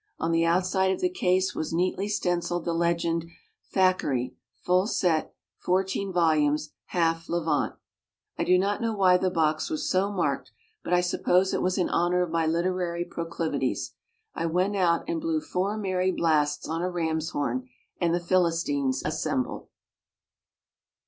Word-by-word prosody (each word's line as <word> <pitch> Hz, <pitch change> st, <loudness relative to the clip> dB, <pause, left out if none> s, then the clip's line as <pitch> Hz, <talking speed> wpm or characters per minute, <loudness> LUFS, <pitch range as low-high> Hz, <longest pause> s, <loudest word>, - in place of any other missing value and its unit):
On 165 Hz, -, -1 dB
the 165 Hz, 0 st, +3 dB
outside 185 Hz, +2 st, +2 dB
of 190 Hz, -, 0 dB
the 365 Hz, -1 st, +1 dB
case 185 Hz, -, +1 dB
was 155 Hz, -, -3 dB
neatly 185 Hz, +4 st, 0 dB
stenciled 175 Hz, -4 st, -1 dB
the 170 Hz, -, 0 dB
legend, 170 Hz, 0 st, 0 dB, 0.4 s
"Thackeray, 180 Hz, -10 st, +1 dB, 0.3 s
Full 180 Hz, +2 st, +3 dB
sett, 170 Hz, -8 st, +1 dB, 0.3 s
14 190 Hz, +1 st, 0 dB
vol., 155 Hz, -4 st, +3 dB, 0.3 s
half 165 Hz, -1 st, 0 dB
Levant." 165 Hz, -3 st, 0 dB, 0.6 s
I -, -, -1 dB
do 180 Hz, -, +4 dB
not 200 Hz, +4 st, 0 dB
know 225 Hz, -1 st, -1 dB
why 185 Hz, -2 st, +5 dB
the 185 Hz, 0 st, 0 dB
box 155 Hz, -3 st, 0 dB
was 155 Hz, -, -2 dB
so 195 Hz, +2 st, +1 dB
marked, 145 Hz, -, -1 dB, 0.3 s
but -, -, -5 dB
I 180 Hz, 0 st, +4 dB
suppose 180 Hz, +1 st, +2 dB
it -, -, 0 dB
was 185 Hz, 0 st, 0 dB
in 180 Hz, -, +2 dB
honor 175 Hz, +1 st, +2 dB
of 175 Hz, -, -5 dB
my 165 Hz, -1 st, +1 dB
literary 175 Hz, +1 st, -1 dB
proclivities. 165 Hz, -, -3 dB, 0.4 s
I 165 Hz, -, -2 dB
went 180 Hz, +5 st, +1 dB
out 175 Hz, -3 st, +2 dB
and 335 Hz, -1 st, -2 dB
blew 325 Hz, 0 st, 0 dB
four 200 Hz, -6 st, -2 dB
merry 185 Hz, -3 st, 0 dB
blasts 150 Hz, -5 st, +1 dB
on 165 Hz, +2 st, -2 dB
a 180 Hz, -, 0 dB
ram's 160 Hz, -2 st, -1 dB
horn, 130 Hz, -3 st, -2 dB, 0.3 s
and 170 Hz, -2 st, +2 dB
the 175 Hz, -, +1 dB
Philistines 165 Hz, -7 st, +1 dB
assembled. 150 Hz, -4 st, -2 dB
175 Hz, 155 wpm, -27 LUFS, 165-185 Hz, 0.6 s, why